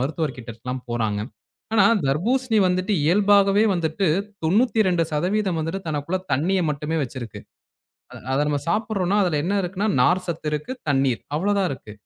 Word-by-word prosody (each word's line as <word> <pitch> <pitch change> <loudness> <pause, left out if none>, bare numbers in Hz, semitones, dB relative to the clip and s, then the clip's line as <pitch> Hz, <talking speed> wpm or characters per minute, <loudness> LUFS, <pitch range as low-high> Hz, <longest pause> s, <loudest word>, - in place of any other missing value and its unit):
மருத்துவர்கிட்டெல்லாம் 130 -4 -4
போறாங்க. 110 -3 -1 0.5
ஆனா 205 -3 +5 0.2
தர்பூசணி 225 - +1
வந்துட்டு 185 +3 0
இயல்பாகவே 200 +3 +4
வந்துட்டு 170 +2 -1 0.4
92% 185 -2 +1
வந்துட்டு 165 +5 -3
தனக்குள்ள 155 +4 -2
தண்ணிய 170 +9 +1
மட்டுமே 150 +2 -3
வச்சிருக்கு. 120 -4 -8 0.9
அத 135 - +1
நம்ம 145 -1 0
சாப்பிடுறோம்னா 205 -1 0
அதுல 165 -5 0
என்ன 195 +4 0
இருக்குன்னா 190 +4 -2
நார் 180 +9 +3
சத்து 160 -2 -3
இருக்கு, 150 - -3 0.2
தண்ணீர். 135 -4 +1
அவ்வளவுதான் 195 +3 +1
இருக்கு. 130 -5 -8
170 Hz, 125 wpm, -23 LUFS, 145-195 Hz, 0.9 s, ஆனா